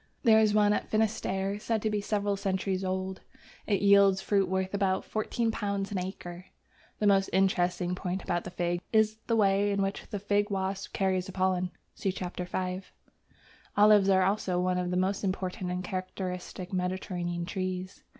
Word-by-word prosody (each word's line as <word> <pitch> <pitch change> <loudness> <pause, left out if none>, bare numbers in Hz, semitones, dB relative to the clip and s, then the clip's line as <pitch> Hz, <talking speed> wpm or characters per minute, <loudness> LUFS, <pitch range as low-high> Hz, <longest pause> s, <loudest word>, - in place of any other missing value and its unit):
There 220 -3 +6
is 215 -1 +4
one 210 -1 +5
at - - -2
Finisterre 205 -2 0
said 225 +1 -1
to 220 - +1
be 210 -1 0
several 205 -1 0
centuries 190 -1 -1
old. 190 0 -3 0.5
It 200 -2 +1
yields 200 -1 +6
fruit 195 -1 +1
worth 190 +1 -1
about 195 -2 +1
£14 215 -3 -1
an 195 - -1
acre. 180 -1 -6 0.5
The 210 - -1
most 195 -1 +4
interesting 180 -1 +1
point 180 0 -3
about 175 -2 -1
the - - -6
Fig 175 -1 -2
is 220 -1 +3
the 230 - +2
way 200 -1 +3
in 200 -1 +1
which 195 +1 -3
the 210 - -3
Fig 205 +1 +1
wasp 195 0 -2
carries 185 -2 0
the - - -6
pollen 185 -1 0 0.2
(see 195 - -1
Chap. 185 -1 -6
V.). 180 +1 -2 1.0
Olives 205 -1 +6
are 190 -1 +5
also 190 -2 0
one 180 0 +1
of 180 0 -2
the 180 - 0
most 190 +3 0
important 185 -1 -2
and 180 0 -2
characteristic 185 0 -5
Mediterranean 180 -1 -2
trees. 185 0 -4
190 Hz, 170 wpm, -29 LUFS, 185-205 Hz, 1.0 s, There